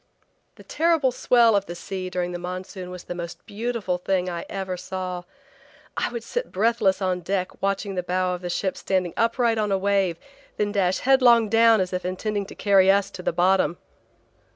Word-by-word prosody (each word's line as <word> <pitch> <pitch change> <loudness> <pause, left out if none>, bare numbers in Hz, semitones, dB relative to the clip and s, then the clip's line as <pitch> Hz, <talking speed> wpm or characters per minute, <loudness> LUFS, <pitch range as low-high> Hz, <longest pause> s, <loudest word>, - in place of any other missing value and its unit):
The - - -15
terrible 320 -5 +2
swell 235 -2 +4
of 200 -1 0
the 175 - -6
sea 185 +1 -5
during 180 -1 -2
the 175 - -5
Monsoon 185 +1 -6
was 180 -1 -8
the - - -6
most 170 -1 -7
beautiful 210 -4 -3
thing 185 0 0
I 170 -1 -5
ever 190 -2 -3
saw. 180 0 -5 0.7
I - - -1
would 235 -2 -5
sit - - -4
breathless 200 -2 +1
on 185 -1 0
deck 185 +1 -3
watching 195 0 -1
the 180 - -1
bow 180 +1 -1
of 180 - -5
the 175 - -4
ship 190 +2 -1
standing 185 -3 -1
upright 230 0 +1
on 210 -1 0
a 195 - +3
wave 195 -3 +1 0.4
then 205 -1 0
dash 190 -3 +1
headlong 245 -4 +5
down 225 0 +5
as 185 -1 -1
if 180 - -2
intending 200 +2 -3
to - - -11
carry 195 -2 +4
us 200 0 +1
to 180 - -8
the - - 0
bottom. 180 -1 +2
190 Hz, 195 wpm, -24 LUFS, 180-215 Hz, 0.7 s, headlong